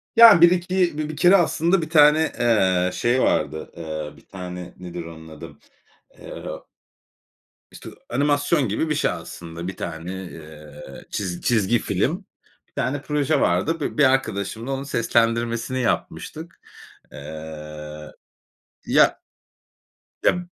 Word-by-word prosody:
Ya 230 -6 +9
bir 170 0 +8
iki 180 -2 +1
bi 155 0 -3
bir 155 - -7
kere 180 +4 +6
aslında 170 +1 +2
bir 155 - -5
tane, 155 0 +5
eee, 95 -6 +3
şey 120 +2 +1
vardı. 80 0 0
Eee, 80 -2 -6
bir - - -20
tane 90 -1 -8
nedir 90 -2 -7
onun 80 -1 -11
adı? 80 -1 -11 0.6
Eee - - -9 1.3
işte - - -10 0.2
animasyon 145 +1 +1
gibi 110 +10 -1
bir 150 - +1
şey 150 - +1
aslında. 85 0 -8
Bir 95 - -6
tane, 85 +1 -5
eee, 80 -3 -11
çiz 90 -4 -4
çizgi 115 0 +2
film, - - -1 0.4
bir - - -40
tane 135 +4 -2
proje 150 +1 0
vardı. 95 - +1
Bi - - -4
bir 150 - +5
arkadaşımla 115 -2 0
onun 135 0 -3
seslendirmesini 115 0 0
yapmıştık. 160 +7 -3 0.5
Eee, 75 0 -9 0.7
ya - - +4 1.0
ya 180 0 +2
115 Hz, 130 wpm, -23 LUFS, -, 1.3 s, Ya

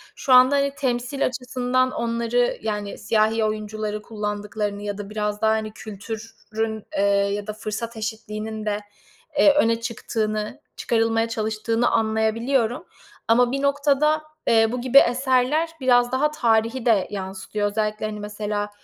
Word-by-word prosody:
Şu 260 - +1
anda, 255 +3 +7
hani, 280 0 +1
temsil 250 +1 -1
açısından 255 0 0
onları, 235 +1 0
yani, 210 -2 -3
siyahi 220 +1 +1
oyuncuları 215 0 -3
kullandıklarını 210 -1 -4
ya 205 -1 -4
da 205 -1 -7
biraz 210 -1 -3
daha, 220 - +4
hani, 220 -1 -1
kültürün, 220 +1 -6
eee, - - +2 0.3
ya 205 0 -4
da 215 - -3
fırsat 220 +2 -5
eşitliğinin 220 0 -5
de, 210 -1 -1 0.6
eee, 295 - +7
öne 230 -4 +2
çıktığını, 215 0 -3 0.2
çıkarılmaya 225 -1 +1
çalıştığını 225 +1 0
anlayabiliyorum 225 +5 +1 0.4
ama 240 +2 +4
bir 275 +1 -1
noktada, 285 +2 +2 0.2
eee, 225 -1 +4
bu 250 0 -3
gibi 260 +2 +4
eserler 260 +5 +2
biraz 245 -1 +4
daha 295 +4 +1
tarihi 230 -2 +1
de 215 -6 +3
yansıtıyor. 195 +1 -3
Özellikle, 215 0 -1
hani, 210 -1 -6
mesela, 210 0 -3
225 Hz, 135 wpm, -23 LUFS, 215-245 Hz, 0.6 s, anda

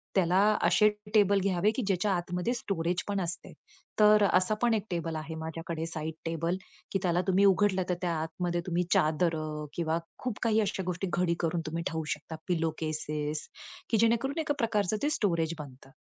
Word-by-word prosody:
त्याला 180 -2 +3 0.3
असे 210 - +5 0.3
टेबल 200 -2 +5
घ्यावे, 195 +1 +2
की 260 - 0
ज्याच्या 195 +1 +1
आतमध्ये 180 +5 -1
स्टोरेज 175 -6 -1
पण 200 -1 -1
असते, 175 0 -4 0.5
तर 210 0 +7
असा 185 +3 +3
पण 240 -1 +3
एक 210 -2 -2
टेबल 165 -2 -2
आहे 160 +1 -6
माझ्याकडे. 160 0 -4
साइड 160 -1 -4
टेबल, 165 +2 -1 0.4
की 195 - +2
त्याला 175 -1 +2
तुम्ही 190 +1 +4
उघडलं, 195 -1 +3
तर 180 - +2
त्या 175 -2 0
आतमध्ये 175 +2 -2
तुम्ही 175 0 +1
चादर 160 +2 +2 0.4
किंवा 165 -1 0 0.2
खूप 250 -5 -4
काही 220 -1 +3
अशा 195 -2 -1
गोष्टी 180 +2 -2
घडी 175 -1 +2
करुन 165 0 0 0.2
ठेवू 165 -1 -2
शकता, 155 +2 -9
पिलो 165 -2 +1
केसेस, 155 -1 -3 0.4
की 225 - +3
जेणेकरून 235 +7 +2
एका 310 -2 0
प्रकारचं 215 -4 +1
ते 295 - +3
स्टोरेज 170 - 0
बनतं. 135 -2 -10
175 Hz, 170 wpm, -29 LUFS, 165-205 Hz, 0.5 s, तर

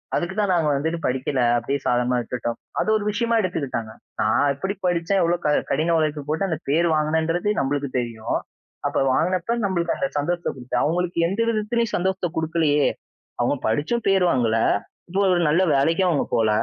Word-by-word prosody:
அதுக்கு 175 +3 -2
தான் 205 -2 +2
நாங்க 165 -3 +2
வந்துட்டு 160 +4 -1
படிக்கல 130 +1 0 0.2
அப்படியே 135 +4 -2
சாதாரணமா 125 0 +1
விட்டுட்டோம். 120 0 -4 0.2
அது - - 0
ஒரு 215 - 0
விஷயமா 230 +2 0
எடுத்துக்கிட்டாங்க. 135 - -3 0.3
நான் 110 +7 +2
எப்படி 190 +8 -3
படிச்சேன்? 175 +2 +1
எவ்ளோ 175 +1 +2
க 150 - +3 0.2
கடின 165 +2 +1
உழைப்பு 155 -1 -1
போட்டு 160 +6 0
அந்த 160 - -2
பேர் 170 +4 +3
வாங்கினேன்றது? 160 +5 0
நம்மளுக்கு 140 0 -1
தெரியும். 115 -2 -3 0.5
அப்ப - - -5 0.2
வாங்கினப்போ 185 - +1
நம்மளுக்கு 175 -3 0
அந்த 275 - -1
சந்தோஷத்தைகொடுத்து 145 -6 -2
அவங்களுக்கு 175 +2 -1
எந்த 195 +5 -3
விதத்திலயும் 225 +1 0
சந்தோஷத்தை 185 -1 -1
கொடுக்கலையே? 155 -3 +2 0.5
அவங்க - - +2
படிச்சும் 155 - 0
பேர் 190 -2 +4
வாங்கல. 115 -3 +2 0.5
இப்போ 190 +3 0
ஒரு 175 - +2
நல்ல 170 +5 +3
வேலைக்கும் 165 +7 +2
அவங்க 155 -5 +1
போல. 110 -1 +2
160 Hz, 160 wpm, -23 LUFS, 140-185 Hz, 0.5 s, பேர்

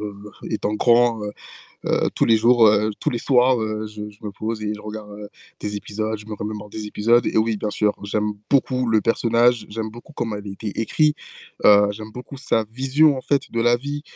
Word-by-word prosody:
heu, 105 -1 -5 0.4
étant 105 -1 -1
grand, 120 -1 +3
heu 105 0 -4 0.5
heu, - - +1
tous - - +2
les 115 -1 +5
jours, 115 0 +5
heu, 105 +1 +3
tous 150 - 0
les 120 - -2
soirs, 125 0 +3
heu, 110 0 -3
je 105 0 -7
je 105 -1 -17
me 105 - -3
pose 110 +2 -5
et 105 0 -2
je 105 - -7
regarde 105 -1 -8 0.3
des 105 0 -4
épisodes, 110 +2 -3
je 105 0 -13
me 110 - -5
remémore 105 0 -6
des 105 0 -6
épisodes 115 +3 +2
et - - -1
oui 110 0 +2
bien 105 +1 -3
sûr, 105 0 +1
j'aime 105 +1 -1
beaucoup 130 -2 +1
le 110 -2 +3
personnage, 115 +1 +2
j'aime 110 +1 -4
beaucoup 120 +7 -13
comment 115 -6 -3
elle 100 0 -9
a - - -5
été 100 +3 -6
écrit, 150 +6 +2 0.5
heu, 105 0 +7
j'aime 110 +1 -8
beaucoup 125 +3 -9
sa 115 -4 0
vision 135 +4 +3
en - - -4
fait 140 0 -1
de 115 - -1
la 120 +1 +4
vie, 145 +4 -5
110 Hz, 220 wpm, -22 LUFS, 105-120 Hz, 0.5 s, heu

